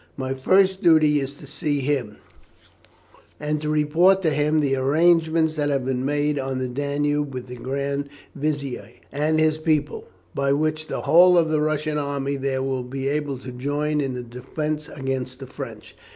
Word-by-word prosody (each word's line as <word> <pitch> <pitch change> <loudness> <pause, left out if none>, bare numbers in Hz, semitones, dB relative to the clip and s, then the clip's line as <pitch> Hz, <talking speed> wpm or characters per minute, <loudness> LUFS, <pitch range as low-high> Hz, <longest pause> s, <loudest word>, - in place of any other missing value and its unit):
My 130 -1 -2
first 190 +8 +3
duty 155 -4 +5
is 140 0 -4
to 145 - -13
see 145 0 -2
him, 130 -6 -1 1.2
and 150 0 -2
to 150 - -2
report 165 +6 +3
to 160 - +2
him 150 +1 +2
the 140 -2 +1
arrangements 160 +3 +3
that 145 -1 0
have 135 -3 0
been 130 -1 -1
made 145 +1 0
on 135 -1 -3
the 130 0 -2
Danube 145 +2 -1
with 125 - -5
the 125 - -9
Grand 140 +2 -3 0.2
Vizier 140 -7 -3 0.2
and 150 +3 +1
his 155 0 +2
people, 155 -2 0 0.3
by 140 0 +1
which 155 +1 -1
the - - -3
whole 180 +2 +6
of 165 -2 +3
the 155 -1 +2
Russian 155 0 0
army 140 -1 -2
there 135 -1 -2
will 135 -1 -1
be 135 +2 -4
able 145 -2 -2
to 130 0 -9
join 145 +4 -1
in 135 -2 -2
the 125 - -5
defence 150 +6 -4
against 135 -2 -4
the - - -7
French. - - -9
145 Hz, 180 wpm, -23 LUFS, 135-155 Hz, 1.2 s, whole